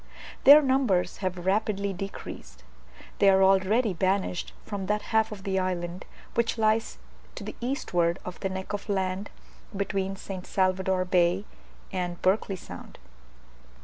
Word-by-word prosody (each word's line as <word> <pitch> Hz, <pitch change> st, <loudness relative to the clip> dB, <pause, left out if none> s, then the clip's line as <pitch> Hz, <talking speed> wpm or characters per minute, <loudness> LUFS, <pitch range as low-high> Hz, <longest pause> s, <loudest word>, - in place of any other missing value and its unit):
Their 290 Hz, +3 st, +10 dB
numbers 260 Hz, -9 st, +1 dB
have 180 Hz, -2 st, -3 dB
rapidly 200 Hz, 0 st, 0 dB
decreased; 175 Hz, -, -8 dB, 0.6 s
they 200 Hz, -, +6 dB
are 190 Hz, 0 st, +5 dB
already 195 Hz, +4 st, +3 dB
banished 185 Hz, 0 st, 0 dB
from 200 Hz, -3 st, -4 dB
that 210 Hz, +1 st, 0 dB
half 220 Hz, 0 st, +3 dB
of 200 Hz, -2 st, -8 dB
the 190 Hz, -1 st, 0 dB
island 180 Hz, -1 st, -3 dB, 0.3 s
which 235 Hz, 0 st, 0 dB
lies 220 Hz, 0 st, +1 dB, 0.4 s
to -, -, -7 dB
the -, -, -6 dB
eastward 175 Hz, -9 st, 0 dB
of 180 Hz, -, -7 dB
the 190 Hz, -, -2 dB
neck 190 Hz, +1 st, -5 dB
of 205 Hz, +1 st, -5 dB
land 190 Hz, 0 st, -1 dB, 0.5 s
between 195 Hz, -1 st, -1 dB
St. 190 Hz, -1 st, -7 dB
Salvador 185 Hz, -1 st, +1 dB
Bay 180 Hz, +1 st, +2 dB, 0.5 s
and 180 Hz, -2 st, -3 dB
Berkeley 195 Hz, +1 st, +2 dB
Sound. 180 Hz, -, -10 dB
190 Hz, 140 wpm, -27 LUFS, 185-210 Hz, 0.6 s, Their